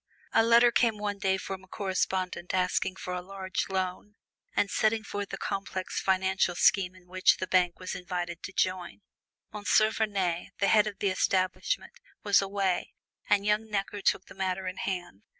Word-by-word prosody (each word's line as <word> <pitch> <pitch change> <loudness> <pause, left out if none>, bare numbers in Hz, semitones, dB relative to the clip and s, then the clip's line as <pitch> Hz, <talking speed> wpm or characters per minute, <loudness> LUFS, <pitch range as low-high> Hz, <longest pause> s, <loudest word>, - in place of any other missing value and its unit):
A - - +6
letter 235 +1 +6
came 230 -2 +2
one 205 -1 -3
day 190 -1 +1
from 190 0 -6
a - - -17
correspondent 185 -2 -2
asking 185 0 +1
for 180 - -5
a 180 - -3
large 190 +1 -4
loan, 190 +2 -3 0.4
and 200 - +1
setting 220 0 +2
forth 205 -1 -5
a - - -4
complex 195 -1 -3
financial 190 -1 +1
scheme 185 0 +3
in 185 -1 -18
which 185 +1 +3
the 185 - -2
bank 180 -1 +2
was 185 - -5
invited 175 -2 -4
to - - -6
join. 185 0 -1 0.5
M. 210 -1 -6
Vernet, 205 -4 +1
the 200 - +2
head 215 -1 +5
of 205 -2 -5
the 200 - +1
establishment, 185 - 0 0.3
was 200 -1 +5
away, 195 -2 -1 0.3
and 205 -1 +3
young 210 +1 +1
Necker 205 0 -2
took 190 - +1
the - - -13
matter 190 0 -2
in 185 +1 -4
hand. 175 - -4
190 Hz, 175 wpm, -29 LUFS, 185-205 Hz, 0.5 s, A